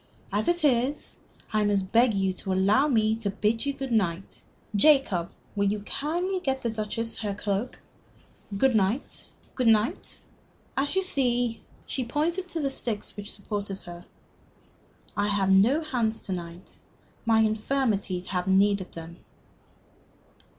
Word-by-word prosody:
As 210 +1 +1
it 345 -1 +2
is, 260 +2 +1 0.4
I 215 0 +3
must 200 -2 +1
beg 235 -1 +4
you 190 -1 +1
to 190 +1 -5
allow 200 +9 +4
me 220 -5 +3
to 220 -3 -2
bid 220 +6 0
you - - +2
good 270 -2 -5
night. 190 -4 -1 0.3
Jacob, 205 - +4 0.3
will 200 0 +2
you 210 0 -2
kindly 345 - -1
get 265 -6 -2
the 235 - 0
Duchess 225 +1 -3
her 205 -3 -3
cloak? 205 +4 -2 0.8
Good 260 +2 +3
night. 215 +6 0 0.3
Good 250 -3 0
night. 220 0 +2 0.6
As 285 +6 0
you 380 - +2
see" 245 -8 0 0.2
she 260 - -2
pointed 330 +9 -1
to 335 - -3
the 275 -1 0
sticks 225 -5 -4
which 205 0 -7
supported 200 -1 -5
her 175 -1 -9 1.1
"I 205 0 +1
have 200 -2 +2
no 225 +11 +5
hands 235 -7 -1
to - - -7
night. 175 -1 -7 0.4
My 225 -1 +4
infirmities 215 -4 0
have 180 -1 -2
need 200 +1 +4
of 185 - -8
them." 165 +1 -9
220 Hz, 150 wpm, -27 LUFS, 195-265 Hz, 1.1 s, no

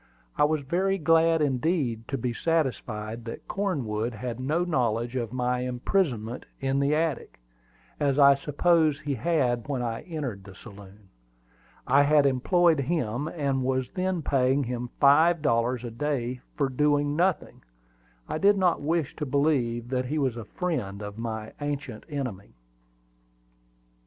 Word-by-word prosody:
I 145 - +4
was 155 0 0
very 190 +7 0
glad 165 -1 +3
indeed 130 -5 0
to 135 - -2
be 120 0 -2
satisfied 115 -7 -2
that 115 - -8
Cornwood 125 - -2
had 120 +2 -5
no 150 +7 0
knowledge 120 -7 0
of 120 -4 -2
my 125 0 0
imprisonment 125 - -1
in 135 0 0
the 140 +2 +2
attic, 155 - -2 0.6
as 140 -2 +1
I 140 -1 +8
supposed 155 +2 +2
he 145 -1 -2
had 125 -3 0
when 135 -4 -2
I 115 -1 -3
entered 140 - -5
the 95 -1 -13
saloon. 100 -2 -14 0.8
I 135 +3 +5
had 145 0 +4
employed 160 +5 +3
him, 140 -3 -1
and 140 -5 -1
was 130 -1 -1
then 185 -3 -2
paying 135 +1 +2
him 125 0 -4
five 155 +3 +5
dollars 120 -1 +1
a 120 - -5
day 125 -1 -2
for 145 -2 +1
doing 145 +2 +1
nothing. 180 +2 0 0.7
I - - -3
did 200 +2 +4
not 180 -5 +2
wish 160 0 -1
to 150 - -2
believe 125 -5 0
that 130 -1 -1
he 150 +5 -2
was 135 -5 0
a 115 -2 -7
friend 105 - -3
of 105 +1 -7
my 110 -2 -5
ancient 145 -5 -4
enemy. 125 - -5
135 Hz, 150 wpm, -27 LUFS, 120-155 Hz, 0.8 s, I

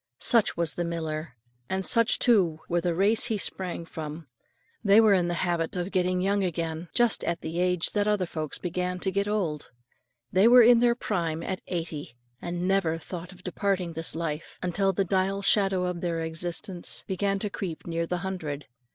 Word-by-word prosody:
Such 230 -4 +3
was 170 -3 0
the 175 - -2
miller, 160 -3 -4 0.3
and 190 0 -1
such 230 -1 +4
too 180 -10 +3
were 175 0 0
the 175 -1 -1
race 205 +6 +3
he 225 -3 -1
sprang 180 -3 -3
from, 160 0 -7 0.6
they 200 0 +6
were 220 -2 +6
in 180 -3 +2
the 175 - -1
habit 170 0 -1
of 180 +2 -3
getting 185 -1 +1
young 200 +1 +1
again, 165 -1 -3
just 240 -2 +3
at 170 - -2
the 165 +2 -4
age 180 -1 +1
that 205 0 0
other 210 -3 +1
folks 155 -3 -5
began 180 +1 -3
to 190 +1 -1
get 200 +2 0
old. 180 -8 -2 0.6
They 190 +4 +5
were 245 0 +8
in 240 +1 +7
their 240 0 +3
prime 165 -8 -2
at 185 +1 -4
eighty, 160 -7 -5 0.3
and 175 +1 -3
never 190 -4 +1
thought 175 +2 -8
of 185 -1 -16
departing 185 -2 -1
this 165 0 0
life, 160 -1 -4
until 195 +2 +1
the 195 +1 0
dial 195 +2 0
shadow 195 -3 +3
of 180 -1 -3
their 170 -2 -1
existence 170 +2 -2
began 195 +1 -1
to 205 +1 -4
creep 175 -6 -5
near 170 0 -2
the 180 - -1
hundred. 150 -7 -4
180 Hz, 190 wpm, -27 LUFS, 165-195 Hz, 0.6 s, were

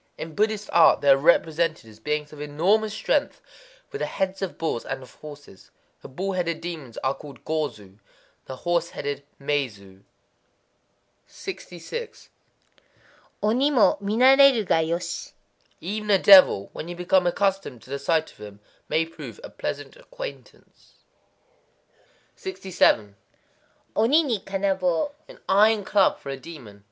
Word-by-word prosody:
In 160 0 -7
Buddhist 215 +2 0
art 165 -2 +6
they 145 - +2
are 135 - +8
represented 160 -1 +1
as 110 -1 -16
beings 150 +4 -3
of 150 - -10
enormous 185 +9 +1
strength, 215 - -1 0.5
with 425 - -6
the - - -2
heads 190 0 -3
of 195 - -4
bulls 160 -8 -2
and 130 - -5
of 130 - -15
horses. 145 -10 -13 0.3
The - - -10
bull 190 +9 -4
headed 170 -3 -2
demons 160 -8 -7
are 130 +1 +1
called 140 -2 -13
Go 155 -2 -1
zu; 100 -1 -17 0.5
the 130 - -7
horse 170 -1 +1
headed 145 0 -5 0.2
Mé 140 -1 0
zu. 100 -2 -17 1.3
66.—Oni 380 - -6
mo 255 -7 +4
mi, 205 +2 -2
narétaru 265 -2 +6
ga 165 - +2
yoshi. 170 +2 -3 0.5
Even 210 +4 -4
a 200 - +6
devil, 185 - +7
when 160 - -7
you 175 - -6
become 180 +1 +2
accustomed 195 - -1
to 130 - -15
the 140 - -3
sight 160 +2 0
of - - -24
him, 105 -1 -11 0.3
may 165 +1 +1
prove 165 - -10
a - - -9
pleasant - - -5
acquaintance. - - -11 1.4
67.—Oni 190 - -1
ni 240 -8 -1
kanabō. 190 - -1 0.2
An - - -14
iron 210 +1 +4
club 195 -1 +3
for 140 - -10
a 135 - -4
demon. 130 -9 -12
170 Hz, 145 wpm, -24 LUFS, 145-205 Hz, 1.4 s, are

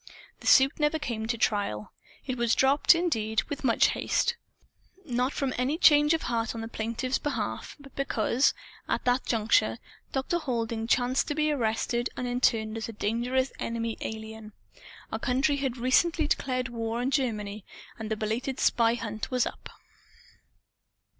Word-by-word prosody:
The - - -8
suit 270 +2 +5
never 300 +1 +2
came 235 -8 -4
to 235 0 -1
trial. 200 - -1 0.3
It 255 - -2
was 235 -2 +2
dropped, 275 +5 +5
indeed, 220 - 0
with 290 - -5
much 235 -3 +4
haste. 480 - 0 0.7
Not 250 -1 0
from 270 -3 -2
any 265 +5 0
change 295 -2 +6
of 325 - -4
heart 230 -1 -1
on 225 - -4
the 225 - -5
plaintiff's 230 +4 -2
behalf; 295 - -3
but 275 -1 -15
because, 260 -1 +1 0.3
at - - -1
that 250 +1 +1
juncture, 210 - +2 0.3
Dr. 270 +6 -1
Halding 230 -5 -2
chanced 250 +2 +2
to 295 - -2
be 305 0 +1
arrested 240 -1 0
and 250 - -2
interned 225 -3 +1
as 225 - -4
a - - -6
dangerous 240 +5 0
Enemy 230 -1 -2
Alien. 220 -1 -7 0.6
Our - - -2
country 270 +3 +1
had 265 -3 -2
recently 310 +7 +2
declared 255 -3 -1
war 230 0 -3
on 250 +2 -1
Germany; 215 -7 -1 0.4
and 220 -1 -5
the 220 - -1
belated 230 +5 -2
spy 230 0 +3
hunt 215 -2 -5
was 250 -2 +1
up. - - -7
245 Hz, 160 wpm, -28 LUFS, 225-270 Hz, 0.7 s, change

